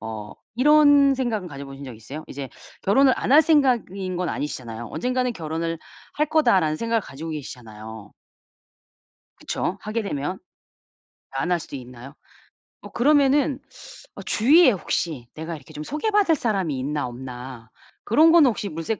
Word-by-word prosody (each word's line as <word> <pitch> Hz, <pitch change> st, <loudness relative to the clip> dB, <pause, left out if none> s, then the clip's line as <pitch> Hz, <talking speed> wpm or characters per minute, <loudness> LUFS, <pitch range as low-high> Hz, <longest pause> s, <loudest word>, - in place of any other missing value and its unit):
어 110 Hz, -1 st, -7 dB, 0.2 s
이런 290 Hz, 0 st, +6 dB
생각은 230 Hz, -8 st, -2 dB
가져보신 140 Hz, -1 st, -9 dB
적 130 Hz, -, -8 dB
있으세요? 140 Hz, +8 st, -9 dB
이제 135 Hz, -1 st, -6 dB, 0.3 s
결혼을 260 Hz, +7 st, +4 dB
안 -, -, -3 dB
할 310 Hz, +2 st, +8 dB
생각인 235 Hz, -, +1 dB
건 180 Hz, -1 st, -2 dB
아니시잖아요. 120 Hz, -5 st, -5 dB
'언젠가는 250 Hz, 0 st, -1 dB
결혼을 165 Hz, 0 st, -3 dB, 0.4 s
할 300 Hz, 0 st, 0 dB
거다.'라는 190 Hz, -, +3 dB
생각을 230 Hz, +2 st, 0 dB
가지고 160 Hz, +2 st, -8 dB
계시잖아요. 110 Hz, -7 st, -9 dB, 1.3 s
그쵸. 190 Hz, -, -3 dB
하게 220 Hz, +2 st, -3 dB
되면 180 Hz, -1 st, -4 dB, 0.9 s
안 135 Hz, +6 st, -2 dB
할 175 Hz, -, +2 dB
수도 145 Hz, -, -8 dB
있나요? 125 Hz, +2 st, -11 dB, 0.7 s
어 -, -, -10 dB
그러면은 280 Hz, +1 st, +3 dB, 0.6 s
어 -, -, -8 dB
주위에 280 Hz, +5 st, +5 dB
혹시 160 Hz, -, -3 dB
내가 160 Hz, +2 st, -6 dB
이렇게 135 Hz, -, -16 dB
좀 150 Hz, -, -6 dB
소개 300 Hz, -, -2 dB
받을 410 Hz, -5 st, +3 dB
사람이 195 Hz, -, -1 dB
있나 145 Hz, +2 st, -2 dB
없나 125 Hz, -1 st, -9 dB, 0.4 s
그런 315 Hz, +8 st, +5 dB
거는 325 Hz, -6 st, +6 dB
혹시 210 Hz, -3 st, -3 dB
물색해 165 Hz, +5 st, -4 dB
175 Hz, 330 characters per minute, -23 LUFS, -, 1.3 s, 할